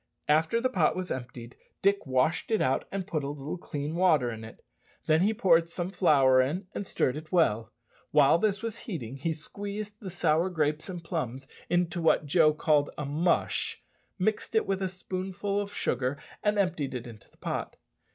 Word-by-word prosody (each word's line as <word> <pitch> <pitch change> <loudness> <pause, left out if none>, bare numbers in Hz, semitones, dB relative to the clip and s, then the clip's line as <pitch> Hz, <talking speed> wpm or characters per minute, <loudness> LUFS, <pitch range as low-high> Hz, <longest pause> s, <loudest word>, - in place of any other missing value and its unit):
After 160 +9 +3
the 250 - +2
pot 180 -11 +2
was 185 0 -4
emptied, 125 -1 -6 0.3
Dick 200 -3 +2
washed 130 +6 +1
it 220 -2 +2
out, 130 - +1
and 195 -2 -3
put 155 -4 -2
a 140 - -3
little 145 +4 -5
clean 145 -2 -4
water 160 -9 +3
in 110 0 -7
it. 110 - -12 0.4
Then 155 +1 +4
he 205 +4 +4
poured 170 -7 +3
some 175 +2 -4
flour 135 -9 +5
in, 160 +10 -1
and 200 - -4
stirred 125 - 0
it 155 0 -9
well. 115 - +2 0.4
While 150 +2 +5
this 210 +2 0
was 230 0 -4
heating, 135 - -6
he 160 +5 -1
squeezed 205 +6 -6
the 195 - -7
sour 170 0 +1
grapes 155 -1 -1
and 175 -2 -6
plums 130 -3 -4 0.2
into 175 0 +1
what 160 -2 +3
Joe 155 +1 +5
called 150 -1 +2
a 150 - -3
"mush," 160 +5 0 0.3
mixed 215 +3 -1
it 220 - +3
with 195 0 -1
a 190 - 0
spoonful 190 +2 -3
of 200 0 -6
sugar, 130 - -1 0.2
and 210 0 +1
emptied 160 -9 0
it 125 0 -5
into 115 -4 -12
the - - -28
pot. - - -4
165 Hz, 190 wpm, -28 LUFS, 140-190 Hz, 0.4 s, flour